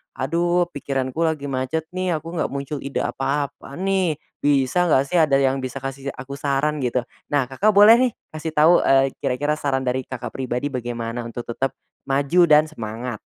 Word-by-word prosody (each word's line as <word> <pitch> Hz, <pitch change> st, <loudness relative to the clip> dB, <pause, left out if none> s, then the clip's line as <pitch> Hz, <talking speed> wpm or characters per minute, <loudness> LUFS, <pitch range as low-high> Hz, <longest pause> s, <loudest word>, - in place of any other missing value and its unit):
aduh 175 Hz, +5 st, +1 dB
pikiranku 135 Hz, -1 st, -3 dB
lagi 155 Hz, -3 st, -2 dB
macet 130 Hz, +4 st, -1 dB
nih, 185 Hz, -1 st, -1 dB
aku 165 Hz, +2 st, -5 dB
nggak -, -, +1 dB
muncul 140 Hz, +1 st, -5 dB
ide 140 Hz, +1 st, -3 dB
apa-apa 140 Hz, +1 st, -3 dB
nih, 190 Hz, -2 st, 0 dB, 0.2 s
bisa 145 Hz, +5 st, +2 dB
nggak 135 Hz, -5 st, +4 dB
sih 180 Hz, -, +3 dB
ada 155 Hz, -4 st, +4 dB
yang 135 Hz, 0 st, +2 dB
bisa 130 Hz, 0 st, -6 dB
kasih 135 Hz, 0 st, -5 dB
aku 140 Hz, +2 st, -8 dB
saran 145 Hz, +2 st, 0 dB
gitu. 125 Hz, -1 st, 0 dB, 0.2 s
Nah 145 Hz, -2 st, +2 dB
Kakak 205 Hz, +10 st, +2 dB
boleh 215 Hz, +3 st, +8 dB
nih 255 Hz, -1 st, +3 dB, 0.2 s
kasih 155 Hz, 0 st, -5 dB
tahu, 160 Hz, +4 st, +6 dB
eee, 135 Hz, 0 st, +3 dB
kira-kira 145 Hz, +4 st, -1 dB
saran 135 Hz, -2 st, 0 dB
dari 130 Hz, 0 st, -2 dB
Kakak 125 Hz, -2 st, -6 dB
pribadi 130 Hz, +2 st, -3 dB
bagaimana 120 Hz, -2 st, -4 dB
untuk 120 Hz, +1 st, -6 dB
tetep 135 Hz, +3 st, -2 dB, 0.3 s
maju 140 Hz, +6 st, +2 dB
dan 150 Hz, -1 st, +6 dB
semangat? 115 Hz, -3 st, -5 dB
140 Hz, 175 wpm, -22 LUFS, 130-160 Hz, 0.3 s, boleh